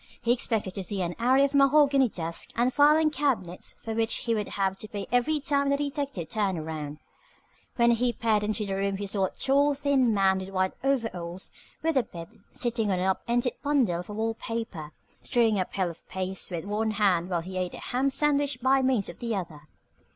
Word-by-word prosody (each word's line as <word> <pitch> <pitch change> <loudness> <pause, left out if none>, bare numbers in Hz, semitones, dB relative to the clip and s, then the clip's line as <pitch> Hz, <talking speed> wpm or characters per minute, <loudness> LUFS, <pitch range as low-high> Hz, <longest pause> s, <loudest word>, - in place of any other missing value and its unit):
He 235 - +1
expected 220 -6 -2
to 195 - -4
see 190 +1 -1
an 175 0 -3
array 260 +4 +4
of 280 - -3
mahogany 275 -2 +5
desks 165 -3 -4
and 245 +2 +2
filing 300 +2 +5
cabinets 255 - -1
for 225 - -6
which 225 0 0
he 230 - 0
would 210 -2 -1
have 190 -1 +1
to 215 - -6
pay 205 -3 -5
every 245 +5 +2
time 280 0 +1
the 280 - +2
detective 280 - -3
turned 200 -3 -1
around. 155 -2 -5 0.8
When 235 -1 +4
he 240 +1 +2
peered 225 -3 +1
into 210 +1 -1
the 195 - -3
room 195 0 -1
he 205 - -4
saw 195 -1 0
a - - -2
tall, 280 +2 +2
thin 275 -4 +2
man 190 -2 +2
in 190 +1 -8
white 185 0 +1
overalls 190 -10 -2 0.3
with 325 -3 +1
a - - +5
bib, 170 -7 -10 0.2
sitting 235 -3 -1
on 185 - +1
an 180 - 0
up 190 0 +1
ended 240 +1 +1
bundle 270 - +1
of 180 - -8
wall 220 +2 -1
paper, 225 -10 -5 0.3
stirring 225 -5 +2
a 185 - +1
pail 185 -2 -2
of 165 - -18
paste 190 0 -3
with 170 -1 -4
one 210 +2 -1
hand 185 -4 +2
while 175 -2 0
he 185 +3 -8
ate 180 -1 -3
a - - -8
ham 260 +3 0
sandwich 285 -1 +1
by 265 +2 +3
means 255 -6 +1
of - - -9
the 230 -2 -2
other. 160 -6 -6
225 Hz, 210 wpm, -27 LUFS, 190-265 Hz, 0.8 s, mahogany